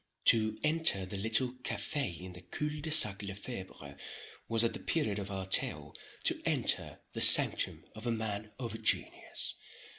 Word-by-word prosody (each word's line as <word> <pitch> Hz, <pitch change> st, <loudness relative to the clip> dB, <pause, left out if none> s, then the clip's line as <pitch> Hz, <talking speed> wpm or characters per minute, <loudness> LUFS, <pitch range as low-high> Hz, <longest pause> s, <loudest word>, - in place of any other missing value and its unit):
To 110 Hz, -2 st, +4 dB
enter 155 Hz, -, +2 dB
the 95 Hz, -, -8 dB
little 110 Hz, +5 st, +1 dB
café 135 Hz, -, -2 dB
in 90 Hz, 0 st, -9 dB
the 90 Hz, -, -12 dB
cul 150 Hz, +10 st, -4 dB
de 160 Hz, -, -1 dB
sac 105 Hz, -10 st, +5 dB
Le 100 Hz, -1 st, -6 dB
Febre 95 Hz, -, -9 dB, 0.5 s
was, 115 Hz, 0 st, +2 dB
at 115 Hz, -, 0 dB
the -, -, -7 dB
period 110 Hz, -11 st, -2 dB
of 100 Hz, 0 st, -6 dB
our 95 Hz, -1 st, -5 dB
tale, 95 Hz, -, +1 dB, 0.3 s
to -, -, 0 dB
enter -, -, -1 dB
the -, -, -4 dB
sanctum -, -, +5 dB
of 110 Hz, +2 st, -8 dB
a -, -, 0 dB
man 110 Hz, -1 st, -4 dB
of 115 Hz, -3 st, -6 dB
genius. -, -, 0 dB
110 Hz, 170 wpm, -31 LUFS, 95-120 Hz, 0.5 s, sac